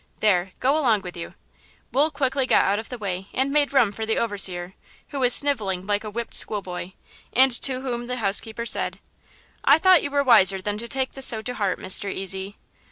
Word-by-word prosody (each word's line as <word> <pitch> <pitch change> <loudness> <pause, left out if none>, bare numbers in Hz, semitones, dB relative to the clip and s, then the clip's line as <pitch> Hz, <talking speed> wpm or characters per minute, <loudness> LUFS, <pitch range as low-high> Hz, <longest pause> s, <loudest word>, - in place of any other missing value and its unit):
There, 185 -3 +1
go 270 +3 +2
along 230 -8 +2
with 180 - -8
you." 170 - -8 0.6
Wool 290 +4 +2
quickly 270 -2 -1
got - - +3
out 200 +2 +1
of 225 - -9
the 250 - -6
way 190 -3 -5
and 265 +2 0
made 290 -1 +2
room 255 -7 +3
for 220 - -6
the 220 0 -1
overseer, 190 -5 0 0.4
who 280 - -5
was 250 -2 +2
sniveling 210 -11 +1
like 205 +1 -1
a 215 - -6
whipped 235 +2 -6
schoolboy, 185 -3 -1 0.4
and 265 +1 +5
to 260 -1 +1
whom 240 -2 -4
the 250 - -3
housekeeper 220 +2 -1
said: - - 0 0.7
"I 285 - +6
thought 370 0 +5
you - - -4
were 285 0 0
wiser 195 -7 +5
than 205 +2 -4
to 235 - -7
take 265 +2 -2
this 270 -1 -1
so 220 -2 +1
to 250 - -5
heart, 200 -6 -2
Mr. 190 +2 0
Ezy." 190 +1 -3
220 Hz, 210 wpm, -23 LUFS, 195-265 Hz, 0.7 s, I